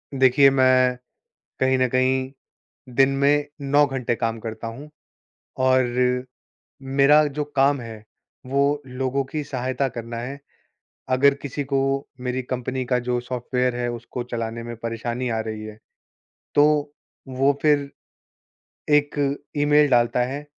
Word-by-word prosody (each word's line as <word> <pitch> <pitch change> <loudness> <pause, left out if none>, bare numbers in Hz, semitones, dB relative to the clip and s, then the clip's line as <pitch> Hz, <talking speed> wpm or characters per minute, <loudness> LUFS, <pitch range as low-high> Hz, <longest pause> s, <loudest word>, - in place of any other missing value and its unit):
देखिए 135 +1 +5
मैं 130 -1 +4 0.6
कहीं 130 0 +3
न 130 - +3
कहीं 130 +1 +1 0.7
दिन 135 0 +6
में 145 +1 +3
9 145 +1 +3
घंटे 125 -3 -2
काम 115 0 -2
करता 110 0 -6
हूँ 135 +7 -8 0.8
और 125 -1 +2 0.8
मेरा 150 +2 +6 0.2
जो 150 - +1
काम 140 0 +3
है 110 -2 -9 0.4
वो 140 +2 +1
लोगों 130 +2 -2
की 155 -1 -2
सहायता 130 +1 -2
करना 115 -1 -7
है। 135 +4 -6 0.8
अगर 140 +2 +5
किसी 140 +1 -4
को 135 - +3 0.4
मेरी 125 +1 -2
कंपनी 130 +1 -3
का 125 0 +1
जो 125 0 +1
सॉफ़्टवेयर 125 0 -2
है 120 0 -2
उसको 120 +1 -6
चलाने 115 -1 -4
में 120 0 -6
परेशानी 120 +2 -3
आ 110 -1 -1
रही 110 -1 -5
है, 110 0 -9 0.8
तो 150 0 +3 0.3
वो 135 +2 +2
फ़िर 145 -2 +2 1.1
एक 145 -1 +1 0.2
ईमेल 145 0 +4
डालता 120 0 +3
है 145 +1 -6
130 Hz, 135 wpm, -23 LUFS, 120-140 Hz, 1.1 s, दिन